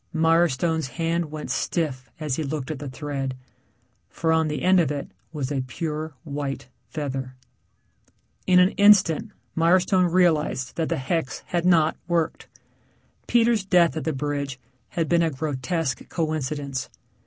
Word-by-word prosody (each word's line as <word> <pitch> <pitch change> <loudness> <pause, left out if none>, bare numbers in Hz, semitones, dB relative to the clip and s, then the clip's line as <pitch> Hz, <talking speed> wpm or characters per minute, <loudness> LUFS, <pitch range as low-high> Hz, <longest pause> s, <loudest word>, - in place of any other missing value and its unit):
Mirestone's 160 -1 +2
hand 170 +1 0
went 155 0 -6
stiff 140 -7 -2
as 150 -4 -1
he - - -2
looked 145 -1 -3
at 150 - -5
the 145 -1 -5
thread, 135 -1 -4 0.7
for 165 -1 -1
on 160 -1 +2
the 150 - -3
end 185 0 +5
of 160 -5 +2
it 145 -1 -4 0.2
was 145 -4 -3
a 135 -2 0
pure 155 +4 -4
white 140 -4 -4 0.2
feather. 135 -2 -4 1.1
In 185 -1 +5
an 180 +1 +6
instant 200 -6 +5 0.3
Mirestone 180 +2 +3
realized 160 -7 +2
that 165 -2 -1
the - - 0
hex 135 +1 -2
had 175 -1 -1
not 165 -3 +4
worked. 170 -2 -1 0.8
Peter's 230 -3 +3
death 180 -4 +4
at 160 - -3
the 160 - +1
bridge 140 -1 -3 0.3
had 165 -3 -1
been 170 +1 +3
a 165 - +2
grotesque 145 -1 -2
coincidence. 145 -4 -2
155 Hz, 145 wpm, -24 LUFS, 140-170 Hz, 1.1 s, an